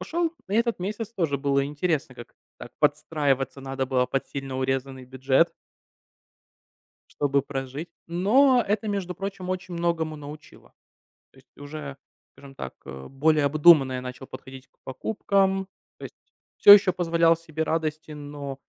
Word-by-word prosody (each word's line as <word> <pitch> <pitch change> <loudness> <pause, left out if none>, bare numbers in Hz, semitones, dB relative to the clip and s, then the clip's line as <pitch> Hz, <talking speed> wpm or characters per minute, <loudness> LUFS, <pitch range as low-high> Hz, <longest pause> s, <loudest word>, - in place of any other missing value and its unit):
Ушёл 335 0 -1 0.2
на - - -6
этот 235 -1 +1
месяц. 215 +4 -5
Тоже 160 -6 0
было 140 -1 +1
интересно, 145 -2 -2
как 120 - -12 0.2
так - - -10
подстраиваться 145 -3 0
надо 135 0 -3
было 125 -1 +1
под 135 - -2
сильно 135 -2 -6
урезанный 130 0 -2
бюджет. 130 +5 +1 1.6
Чтобы 140 -1 0
прожить. 135 +3 -6 0.2
Но 240 +9 +4
это, 205 +2 -1
между 190 -3 -3
прочим, 195 -2 -6
очень 185 -1 -4
многому 170 -2 -1
научило. 150 +1 -12 0.6
То - - -24
есть - - -28
уже, 145 -1 -8 0.3
скажем 135 0 -15
так, 65 - -7
а 65 0 -9
более 150 +3 +2
обдуманно 150 -2 +5
я 125 - -3
начал 125 +1 -8
подходить 130 0 -11
к - - -46
покупкам, 195 +5 0 0.3
то - - -11
есть. - - -11 0.4
Всё 205 - +11
еще 200 -2 +6
позволял 170 -2 +2
себе 160 -1 -7
радости, 155 -1 -3
но, 145 -2 -7
150 Hz, 150 wpm, -25 LUFS, 135-180 Hz, 1.6 s, Всё